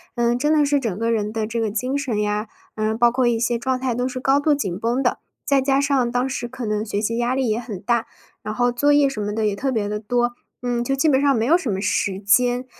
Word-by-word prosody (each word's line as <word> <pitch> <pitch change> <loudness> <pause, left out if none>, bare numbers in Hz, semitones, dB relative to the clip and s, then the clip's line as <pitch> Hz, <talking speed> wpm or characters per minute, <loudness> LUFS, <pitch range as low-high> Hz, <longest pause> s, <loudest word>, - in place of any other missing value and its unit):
嗯， 240 0 +1
真 295 +4 +1
的 300 -1 +4
是 285 0 +2
整 220 -7 -3
个 230 +1 0
人 210 -1 -1
的 220 -1 -2
这 230 +2 -3
个 220 - 0
精 250 +6 -2
神 255 -7 -2
呀， 210 +1 -1 0.3
嗯， 215 0 -1
包 240 0 +4
括 250 0 +1
一 235 -1 +1
些 240 +1 +1
状 260 +1 -1
态， 255 -2 -1
都 245 +2 -1
是 255 0 -5
高 270 +2 +3
度 290 0 +2
紧 195 -9 -3
绷 240 +4 0
的。 245 - 0 0.2
再 280 -1 +2
加 270 +1 +2
上， 270 -4 +1
当 250 +2 0
时 240 -2 -4
可 255 0 -7
能 215 0 -1
学 205 -1 -2
习 230 +2 -1
压 240 +2 0
力 260 -4 0
也 215 - 0
很 220 -6 -7
大， 235 +1 0 0.4
然 215 +1 -5
后 245 0 +2
作 285 +4 +2
业 290 -1 +4
什 270 - -6
么 205 0 -3
的 220 0 -1
也 210 - +1
特 265 +7 -2
别 220 -5 -1
地 210 0 -3
多， 240 +2 0 0.3
嗯， 245 -1 -1
就 270 +3 0
基 310 +4 +2
本 265 -2 +4
上 280 -1 +3
没 225 - 0
有 320 +7 +5
什 325 -9 -4
么 195 -1 -2
时 195 -2 0
间。 245 +5 +2
240 Hz, 300 characters per minute, -22 LUFS, 215-265 Hz, 0.4 s, 有